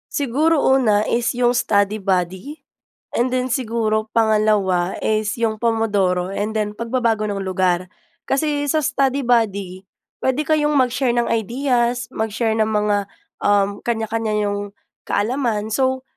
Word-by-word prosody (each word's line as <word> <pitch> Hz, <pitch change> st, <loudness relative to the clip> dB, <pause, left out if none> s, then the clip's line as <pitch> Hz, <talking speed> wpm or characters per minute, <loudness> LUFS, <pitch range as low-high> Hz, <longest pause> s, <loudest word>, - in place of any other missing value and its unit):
Siguro, 295 Hz, +4 st, +2 dB
una 220 Hz, -6 st, +3 dB
is 235 Hz, -1 st, +1 dB
yong 245 Hz, 0 st, +1 dB
study 205 Hz, -3 st, +2 dB
buddy. 190 Hz, -, -2 dB, 0.6 s
And 245 Hz, +1 st, +1 dB
then, 255 Hz, 0 st, 0 dB
siguro 225 Hz, -4 st, -1 dB
pangalawa 210 Hz, -5 st, +2 dB
is 215 Hz, +1 st, -1 dB
yong 225 Hz, -2 st, +1 dB
Pomodoro, 205 Hz, -6 st, 0 dB
and 210 Hz, +2 st, -2 dB
then 210 Hz, -1 st, -2 dB
pagbabago 230 Hz, -1 st, 0 dB
ng 200 Hz, -, -3 dB
lugar. 185 Hz, -1 st, 0 dB, 0.4 s
Kasi, 290 Hz, +1 st, 0 dB
sa 310 Hz, +2 st, +1 dB
study 275 Hz, 0 st, +1 dB
buddy 200 Hz, -6 st, 0 dB, 0.3 s
puwede 260 Hz, +3 st, 0 dB
kayong 300 Hz, -1 st, +2 dB
mag-share 255 Hz, -1 st, +1 dB
ng 240 Hz, -1 st, 0 dB
ideas. 240 Hz, +1 st, 0 dB
Mag-share 220 Hz, +1 st, -1 dB
ng 220 Hz, -, +3 dB
mga, 210 Hz, -1 st, +1 dB, 0.4 s
um, 205 Hz, 0 st, +1 dB
kaniya-kaniya 225 Hz, -1 st, -1 dB
niyong 205 Hz, 0 st, -3 dB, 0.3 s
kaalaman. 220 Hz, -2 st, -1 dB
So, 260 Hz, +2 st, 0 dB
225 Hz, 130 wpm, -20 LUFS, 205-250 Hz, 0.6 s, una